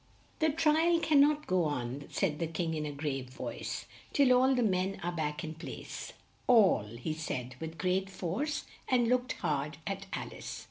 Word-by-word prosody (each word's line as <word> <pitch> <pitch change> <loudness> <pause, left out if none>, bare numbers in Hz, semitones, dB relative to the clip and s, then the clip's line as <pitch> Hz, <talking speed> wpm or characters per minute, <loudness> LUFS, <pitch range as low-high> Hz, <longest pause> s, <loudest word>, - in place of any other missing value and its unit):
"The 315 -1 +4
tri 320 +2 +3
al 335 - +4
can 310 -3 +4
not 300 +1 +3
go 180 -2 +2
on," 140 -1 -3
said 155 -7 0
the 165 - 0
King 165 +1 -2
in 155 -1 -2
a - - -3
grave 140 -3 -3
voice, 130 - -5 0.3
"till 275 -3 +5
all 260 +2 +5
the 245 - +2
men 190 -2 +1
are 175 - 0
back 150 -3 -2
in 160 -1 -4
place 160 - -7 0.3
all," 215 - +6
he 155 +6 -2
said 130 -5 -4
with 160 0 -6
great 185 +2 +1
force 195 - -2 0.2
and 245 -2 +3
looked 250 +1 +2
hard 145 0 -2
at 195 0 -4
Al - - -4
ice. - - -6
180 Hz, 190 wpm, -32 LUFS, 150-250 Hz, 0.3 s, all